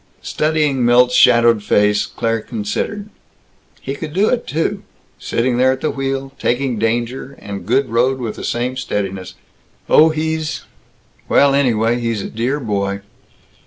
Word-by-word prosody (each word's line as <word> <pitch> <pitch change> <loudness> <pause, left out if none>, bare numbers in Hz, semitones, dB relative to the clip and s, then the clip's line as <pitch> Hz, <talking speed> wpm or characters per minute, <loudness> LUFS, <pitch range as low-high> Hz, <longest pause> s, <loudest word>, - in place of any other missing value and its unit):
Studying 150 -4 0
Milt's 125 +1 +4
shadowed 115 -3 +5
face, 105 0 +2
Claire 115 -1 -2
considered, 120 - -4 0.7
"He 135 - -4
could 150 +1 -7
do 200 +5 +2
it, 245 -1 -1
too. 160 +3 -1 0.4
Sitting 120 +1 -1
there 130 +1 +4
at 130 - -8
the 155 - 0
wheel, 135 0 -3
taking 125 -2 -1
danger 120 +4 -2
and 100 -2 -8
good 130 +4 +2
road 125 +3 +1
with 120 -4 -5
the - - -8
same 125 +2 -2
steadiness. 95 -7 -4 0.5
Oh, 160 +1 +6
he's 160 0 -2 0.7
well, 140 -1 +4
anyway, 120 -4 +2
he's 115 -4 -2
a - - -7
dear 125 +6 -1
boy." 100 -4 -2
125 Hz, 145 wpm, -18 LUFS, 115-140 Hz, 0.7 s, Oh